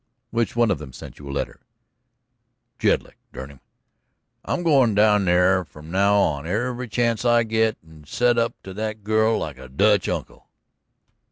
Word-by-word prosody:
"Which 115 0 -1
one 120 -2 +3
of 85 - -1
them 70 -4 -10
sent - - -11
you 70 -1 -10
a - - -4
letter?" - - -4 1.2
"Jedlick, - - 0 0.2
dern 65 +2 -8
him. 70 - -17 0.8
I'm 175 - -2
goin' 135 -10 +3
down 105 -1 +4
there 90 +1 +3
from 75 0 -13
now 100 +2 +3
on 80 -6 +1
every 120 +6 -2
chance 115 -1 0
I 120 -1 +4
get 110 0 0
and 80 -2 -17
set 120 +6 +2
up 115 +1 0
to 95 - -9
that 110 +1 -5
girl 110 +1 +2
like 75 -4 -5
a 65 -1 -11
Dutch 100 +7 +2
uncle." - - -5
105 Hz, 170 wpm, -23 LUFS, 80-115 Hz, 1.2 s, down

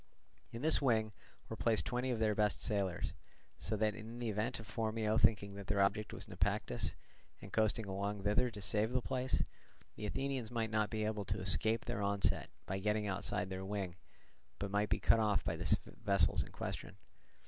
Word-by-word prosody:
In 115 +3 -6
this 160 0 +4
wing 110 -5 +3 0.4
were - - -5
placed 115 -2 +1
twenty 125 +1 -1
of 125 - +1
their 110 -1 +2
best 105 0 +1
sailers; 100 -5 -1 0.5
so 110 - -2
that 105 0 +2
in 110 +2 -8
the 120 -2 -2
event 110 +5 -1
of 110 - -8
Phormio 110 0 0
thinking 100 -2 +4
that 100 -1 -8
their 105 -1 +1
object 100 +2 +2
was - - -5
Naupactus, - - -1 0.4
and - - -11
coasting 110 0 +2
along 100 +1 -2
thither 105 +5 +3
to 105 -3 -8
save 105 +6 +2
the 130 - +2
place, 130 -1 0 0.5
the 105 - -4
Athenians 135 -1 -2
might 115 -2 -1
not 110 -1 +2
be 110 0 -1
able 105 -2 -1
to - - -2
escape 110 +4 +2
their 100 - -2
onset 100 0 +1 0.2
by 95 +1 -2
getting 105 +1 +1
outside 95 -1 -2
their 95 0 -3
wing, 95 -3 -3 0.6
but 100 -1 -3
might 105 +1 +1
be - - +2
cut 115 - +5
off 105 -2 +2
by - - -1
the - - +2 0.3
vessels 100 -1 +4
in - - -7
question. - - -5
105 Hz, 190 wpm, -36 LUFS, 100-115 Hz, 0.6 s, cut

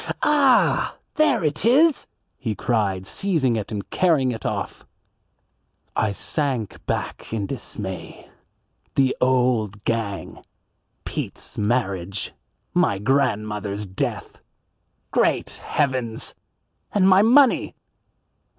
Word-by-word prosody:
"Ah, 280 -4 +4 0.2
there 305 - +3
it 150 +1 -1
is," 280 +7 +4 0.3
he 115 -5 -2
cried, 100 -6 0
seizing 150 - 0
it 110 -1 -4
and 105 -2 -4
carrying 155 -8 +3
it 110 - -4
off. - - -4 1.1
I 110 - +1
sank 130 - -3
back - - -3
in 110 -3 -1
dismay. 100 -5 -6 0.7
The 135 -1 +3
"old 125 -5 +1
gang!" 110 -4 -3 0.6
Pete's - - -5
marriage! 100 -4 -1 0.4
My 100 - +2
grandmother's 105 -4 0
death! 95 -1 -4 0.7
Great - - +1
heavens! 130 -6 -1 0.6
And 195 -2 +3
my 190 0 +7
money! 255 +4 +4
120 Hz, 95 wpm, -23 LUFS, 105-155 Hz, 1.1 s, my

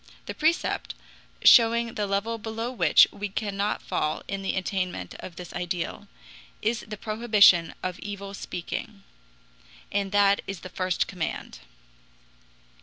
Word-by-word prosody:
The - - -5
precept, - - 0 0.5
showing 230 0 +6
the 205 -1 -2
level 210 +4 -1
below 225 +2 -4
which 255 - +6
we 205 0 -5
cannot 200 0 -2
fall 155 0 -2
in 195 0 -3
the 195 - -2
attainment 185 -1 -3
of 175 - -9
this 180 -1 -9
ideal, 175 -1 -4 0.5
is 225 +2 0
the 210 -1 -6
prohibition 210 -6 +4
of 185 -1 -3
evil 200 -1 -7
speaking. 195 +2 -6 0.9
And 200 -1 -1
that 200 -1 +4
is 195 -3 -5
the 185 - -8
first 185 0 0
command. 165 - -5
200 Hz, 130 wpm, -26 LUFS, 185-215 Hz, 0.9 s, showing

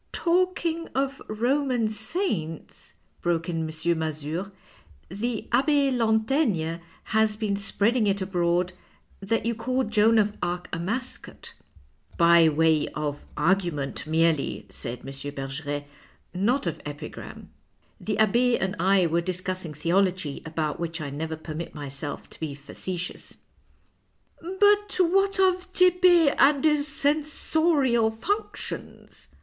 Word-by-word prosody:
" - - -42
Talking 340 -2 0
of 275 +1 -1
Roman 245 +1 +1
saints," 215 - -3 0.3
broke 170 -1 0
in 170 -2 -2
M. 160 +1 -1
Mazure, 160 +4 -3 0.3
" - - -36 0.2
the 220 +5 -3
Abbe 280 +2 +3
Lantaigne 220 - +1 0.3
has 220 -1 +1
been 210 -2 -1
spreading 210 +3 +1
it 200 0 +1
abroad 180 -1 0 0.5
that 225 +4 -1
you 235 - +1
called 250 +1 -1
Joan 220 +1 +4
of 210 -1 +2
Arc 175 +1 -2
a - - -4
mascot." 230 +9 -4 0.3
" - - -27
By 170 -1 +7
way 160 0 +2
of 145 -1 -3
argument 170 -5 0
merely," 160 -2 +1
said 120 -1 -6
M. - - -15 0.3
Bergeret, 145 +2 -4 0.3
" - - -39 0.2
not 265 -1 +1
of 170 - -3
epigram. 145 +1 -8 0.5
The 210 -2 -2
Abbe 235 +3 +3
and 190 +1 -2
I 190 +1 +4
were 170 +1 +1
discussing 185 -2 -3
theology, 175 -1 0
about 155 -2 -2
which 165 0 -3
I 145 -3 -5
never 160 +3 -4
permit 160 +1 -7
myself 145 0 -6
to - - -14
be 155 -3 -4
facetious." 175 +5 -6 0.6
" - - -37 0.2
But 410 0 +4
what 390 +2 +2
of 370 -1 +2
Tepe 360 -4 +5
and 280 +1 +5
his 300 -1 +3
censorial 295 -4 +1
functions 400 - -5
200 Hz, 130 wpm, -26 LUFS, 165-265 Hz, 0.6 s, By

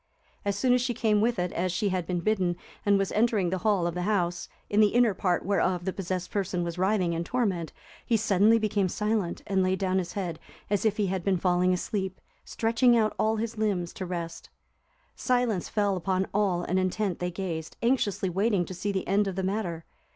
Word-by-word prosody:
As 200 -1 -1
soon 250 +3 +3
as 250 - +3
she 245 -1 -1
came 215 -3 +2
with 235 +1 +1
it, 180 0 -1
as 180 +1 -1
she 205 +3 0
had 185 -3 -2
been 180 -1 -1
bidden, 185 -4 +1 0.3
and 200 0 +5
was 195 -1 -1
entering 215 -5 +2
the 185 - -1
hall 200 -3 +2
of 170 - -1
the 180 - -3
house, 180 -3 -1 0.2
in 205 - +1
the 215 - +7
inner 240 -3 +4
part 180 -1 0
whereof 185 -2 +1
the 190 - -1
possessed 185 -1 -4
person 190 -3 -1
was 170 0 -4
writhing 185 -2 +2
in 165 +1 -2
torment, 190 -7 -1 0.3
he 230 - +2
suddenly 215 +1 +4
became 205 -3 0
silent, 210 -3 -1
and 195 -2 +1
laid 185 0 +1
down 190 -1 +1
his 175 -2 -4
head, 175 -5 -3 0.3
as 205 +1 +1
if 215 - +2
he 210 - +1
had 190 -2 -2
been 195 -1 +2
falling 180 +1 +2
asleep, 190 +1 -2 0.2
stretching 235 +2 +2
out 215 -1 +2
all 220 +1 +2
his 225 0 -4
limbs 190 -6 -1
to 185 - -5
rest. 170 -2 -5 0.7
"Silence 245 -7 0
fell 205 -2 +1
upon 185 +1 0
all 195 -4 +1
and 185 +2 0
intent 185 0 -1
they 180 - -1
gazed,"(348) 175 +3 -4
anxiously 205 -7 0
waiting 195 0 +1
to 185 - -7
see 185 +3 -2
the 190 -2 -3
end 200 +2 +2
of 190 - -3
the 190 - -2
matter. 185 -4 -2
190 Hz, 215 wpm, -27 LUFS, 180-215 Hz, 0.7 s, the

